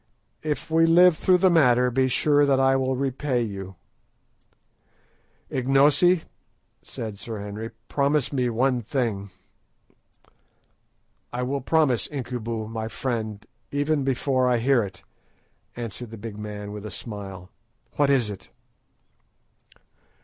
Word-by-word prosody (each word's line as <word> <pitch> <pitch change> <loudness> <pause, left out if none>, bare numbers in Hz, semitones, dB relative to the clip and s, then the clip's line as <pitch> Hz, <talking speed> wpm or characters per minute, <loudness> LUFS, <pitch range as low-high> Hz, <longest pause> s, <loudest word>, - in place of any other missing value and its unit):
If 150 0 -3
we 165 0 +4
live 175 +1 +6
through 180 +3 +4
the 185 0 +4
matter, 125 -6 +4
be 130 +2 +2
sure 145 +3 +3
that 140 -2 +3
I 135 0 +4
will 130 0 0
repay 135 -1 -1
you." 95 -3 -6 1.8
"Ignosi," 145 +7 +4 0.6
said 110 -3 -7
Sir 110 +2 -6
Henry, 105 +2 -6 0.2
"promise 140 0 +1
me 125 -3 +1
one 125 +2 +1
thing." 110 -4 -2 2.0
"I 125 +1 -3
will 135 +2 -2
promise, 135 -4 +2
Incubu, 120 -5 -4
my 110 0 -4
friend, 110 -1 -4 0.2
even 145 0 0
before 130 -1 +1
I 125 - +3
hear 125 +1 +3
it," 95 -4 -7 0.7
answered 120 0 -6
the 115 - -9
big 110 0 -7
man 105 -1 -6
with 105 -1 -7
a - - -6
smile. 95 -3 -7 0.5
"What 145 -1 +3
is 125 -6 +2
it?" 100 - -10
125 Hz, 125 wpm, -25 LUFS, 110-140 Hz, 2.0 s, live